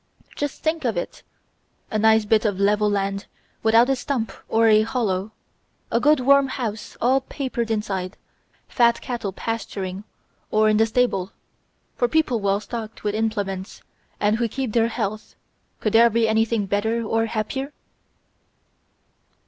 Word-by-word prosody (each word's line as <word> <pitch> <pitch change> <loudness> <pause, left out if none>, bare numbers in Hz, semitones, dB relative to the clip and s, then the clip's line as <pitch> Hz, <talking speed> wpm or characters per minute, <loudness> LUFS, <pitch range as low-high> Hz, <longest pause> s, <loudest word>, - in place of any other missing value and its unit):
Just 290 -1 -4
think 320 +1 0
of 230 -7 -1
it; 175 - -5 0.7
a 215 - 0
nice 220 0 +4
bit 215 +1 +3
of 205 -4 -1
level 210 +1 +3
land 200 0 -2 0.3
without 225 +2 +5
a 270 - +2
stump 245 -5 -2 0.2
or 225 0 +3
a 215 -1 +6
hollow, 215 -4 -1 0.6
a 230 - +2
good 300 +3 +4
warm 275 +2 +4
house 225 -5 -5
all 260 +3 +3
papered 260 -4 -4
inside, 195 -4 -2 0.5
fat 235 -2 +3
cattle 235 -5 -4
pasturing 195 -3 -4 0.5
or 215 0 +3
in 215 - +3
the 225 +1 +4
stable; 220 -5 0 0.6
for 245 - +1
people 255 -4 +1
well 200 0 +1
stocked 225 0 -7
with 205 -1 -1
implements 205 -3 -3 0.4
and 210 +1 +2
who 235 0 0
keep 245 0 -4
their 230 -1 +3
health, 215 -2 -4 0.4
could 215 - -1
there 230 +1 +7
be 230 0 +2
anything 220 -1 +1
better 220 +4 0
or 225 +1 0
happier?" 265 +6 -3
220 Hz, 150 wpm, -23 LUFS, 205-240 Hz, 0.7 s, there